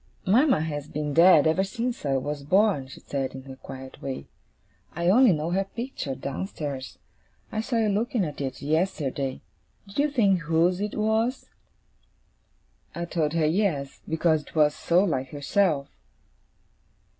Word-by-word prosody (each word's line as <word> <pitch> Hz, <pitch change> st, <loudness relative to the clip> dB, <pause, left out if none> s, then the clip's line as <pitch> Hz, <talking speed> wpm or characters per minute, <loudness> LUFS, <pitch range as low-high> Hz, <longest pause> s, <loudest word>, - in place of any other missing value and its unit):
'Mama 240 Hz, -, +4 dB
has 150 Hz, -2 st, -4 dB
been 150 Hz, -1 st, -3 dB
dead 165 Hz, -1 st, +7 dB
ever 160 Hz, +4 st, +3 dB
since 235 Hz, -, -3 dB
I 135 Hz, -1 st, +2 dB
was 145 Hz, +2 st, -3 dB
born,' 185 Hz, -2 st, +2 dB
she 130 Hz, -, -11 dB
said, 135 Hz, -2 st, -4 dB
in 130 Hz, -, -8 dB
her 135 Hz, -1 st, -10 dB
quiet 130 Hz, 0 st, -10 dB
way. 135 Hz, -1 st, -5 dB, 0.7 s
'I 170 Hz, +1 st, +1 dB
only 240 Hz, +3 st, +6 dB
know 160 Hz, 0 st, -1 dB
her 190 Hz, +2 st, +1 dB
picture, 215 Hz, -, -5 dB
downstairs. 140 Hz, -2 st, -5 dB, 0.5 s
I 220 Hz, -, -1 dB
saw 235 Hz, +1 st, -2 dB
you 225 Hz, -1 st, +2 dB
looking 210 Hz, 0 st, 0 dB
at 150 Hz, -2 st, -6 dB
it 135 Hz, -1 st, -4 dB
yesterday. 145 Hz, -4 st, -1 dB, 0.4 s
Did 195 Hz, +6 st, -7 dB
you 295 Hz, +1 st, +3 dB
think 205 Hz, -9 st, +3 dB
whose 165 Hz, +4 st, +1 dB
it 210 Hz, 0 st, -3 dB
was?' 220 Hz, +4 st, 0 dB, 1.4 s
I 170 Hz, -, -3 dB
told 160 Hz, -3 st, -1 dB
her 165 Hz, -2 st, +2 dB
yes, 155 Hz, -5 st, 0 dB
because 160 Hz, -1 st, +2 dB
it -, -, -17 dB
was 150 Hz, -1 st, +4 dB
so 175 Hz, +4 st, +2 dB
like 135 Hz, -9 st, -1 dB
herself. 145 Hz, 0 st, +1 dB
165 Hz, 155 wpm, -26 LUFS, 145-200 Hz, 1.4 s, dead